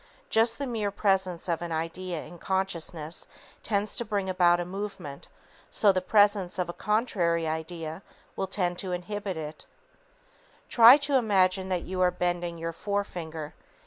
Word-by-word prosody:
Just 225 +1 +4
as - - -17
the 280 - -3
mere 225 -5 -1
presence 190 -4 0
of 170 -1 -1
an 170 -1 -4
idea 165 +1 -3
in 175 - -12
consciousness 170 -4 -3 0.3
tends 205 -1 0
to - - 0
bring 200 -3 -2
about 175 -1 +4
a 175 - -2
movement, 190 -6 -6 0.4
so 205 - +4
the 185 -1 0
presence 205 -2 +3
of 180 -2 -1
a 175 - -5
contrary 180 -7 0
idea 160 +1 -4 0.3
will 195 - -2
tend 180 -2 -1
to 185 -2 -3
inhibit 195 +1 -4
it. 155 0 -7 1.0
Try 235 +3 +9
to 280 -1 +3
imagine 190 -5 +2
that 180 -2 -1
you 185 0 -3
are 180 - +5
bending 175 -1 -2
your 165 0 -4
forefinger. 165 -5 -4
185 Hz, 160 wpm, -28 LUFS, 170-205 Hz, 1.0 s, Try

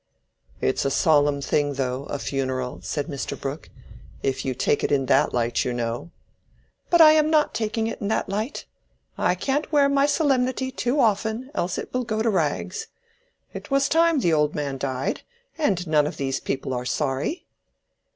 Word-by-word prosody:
"It's - - +1
a 140 - +1
solemn 145 0 +3
thing, 145 +1 0
though, 130 0 -2
a 145 - -4
funeral," 130 -6 -3
said 140 +10 -3
Mr. 140 -4 -5
Brooke, 140 +3 -5 0.5
"if 135 -1 -1
you 130 -1 -2
take 145 - +1
it - - 0
in 135 -2 +2
that - - +3
light, 120 -1 0
you 125 - -2
know." 120 +4 -3 0.8
"But 345 -1 +5
I 310 -1 +10
am 310 0 +4
not 310 -1 +3
taking 220 0 -1
it 225 - -4
in 200 - -2
that 220 - 0
light. 215 +7 -3 0.5
I 180 - +1
can't 275 - -1
wear 290 -2 +5
my 280 0 +3
solemnity 260 -3 +1
too 260 +1 -1
often, 220 +3 +1
else 175 - -2
it - - -6
will 255 0 0
go 220 -2 -1
to 225 - +2
rags. 180 +1 -1 0.7
It - - -8
was 275 0 +3
time 330 -2 +3
the 170 -6 +2
old 150 -1 +2
man 140 -2 -3
died, 130 -1 -2 0.3
and 200 - 0
none 150 -2 +3
of 160 - -6
these 135 -1 -1
people 135 -1 -3
are 125 0 -2
sorry." 135 - -2
165 Hz, 180 wpm, -24 LUFS, -, 0.8 s, I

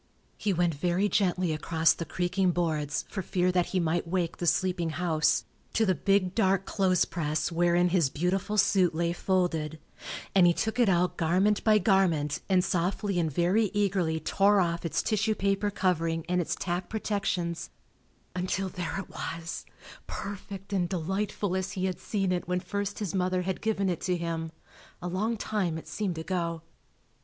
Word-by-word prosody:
He 210 - -1
went 175 -2 +2
very 175 +6 +1
gently 180 -4 +1
across 160 +1 +2
the 165 - -5
creaking 180 +2 0
boards, 155 -4 -1
for 190 - -4
fear 180 0 +1
that 180 -1 +1
he 185 - 0
might 170 0 0
wake 170 -1 -1
the 175 - -2
sleeping 180 0 +1
house, 160 -1 +1 0.3
to 225 - +3
the 190 - +3
big 185 +2 +1
dark 195 -3 +2
clothes 185 -3 +2
press 155 -1 -2
wherein 175 +1 +3
his 170 -6 +2
beautiful 185 +7 -1
suit 190 -4 +3
lay 170 +1 0
folded, 175 -4 0 0.6
and 185 -2 +6
he 170 - +3
took 220 +2 -1
it 235 -4 +5
out 180 -1 +2
garment 185 +6 +2
by 215 -1 +5
garment 175 -7 +2
and 185 -2 +4
softly 185 +2 0
and 160 -2 0
very 180 +9 +2
eagerly 185 -6 +1
tore 200 +6 +3
off 170 -2 0
its - - -1
tissue 215 0 +1
paper 200 +1 +1
covering 165 -5 0
and 180 0 +1
its 170 - -2
tacked 175 0 -3
protections, 195 -6 -2 0.7
until 185 +1 -1
there 175 -1 -4
it 195 - -6
was, 165 0 -6 0.4
perfect 200 0 -6
and 180 -3 +1
delightful 190 +2 -2
as 190 0 -2
he 185 -1 -1
had 185 -2 -2
seen 195 -3 -1
it 175 -2 -1
when 180 0 0
first 200 +2 -3
his 205 -4 -3
mother 185 -1 +1
had 190 0 -3
given 210 -3 0
it 180 -2 -1
to 180 -1 0
him—a 165 +1 -7
long 210 +6 -1
time 195 -6 -1
it 160 - -9
seemed 195 -6 -3
ago. 170 -1 -2
180 Hz, 170 wpm, -28 LUFS, 170-195 Hz, 0.7 s, and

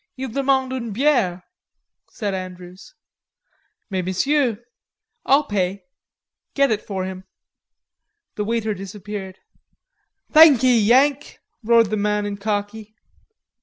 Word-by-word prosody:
"Il 260 0 -5
demande 265 +1 0
une 235 -4 -4
biere," 225 -9 +1 0.7
said 205 -4 -4
Andrews. 185 +3 -9 1.0
"Mais 190 -1 -1
Monsieur...." 240 +6 0 0.7
"I'll 280 +3 +4
pay. 195 -5 -2 0.7
Get 275 -2 +3
it 215 -1 0
for 190 -2 -4
him." 190 0 -8 1.1
The 210 - -3
waiter 220 0 -1
disappeared. 195 0 -8 0.9
"Thankee, 260 -6 +6
Yank," 270 +6 +2 0.3
roared 230 -1 +3
the 215 - 0
man 210 0 0
in 205 -1 -4
khaki. 210 +1 -4
210 Hz, 105 wpm, -21 LUFS, 195-260 Hz, 1.1 s, Thankee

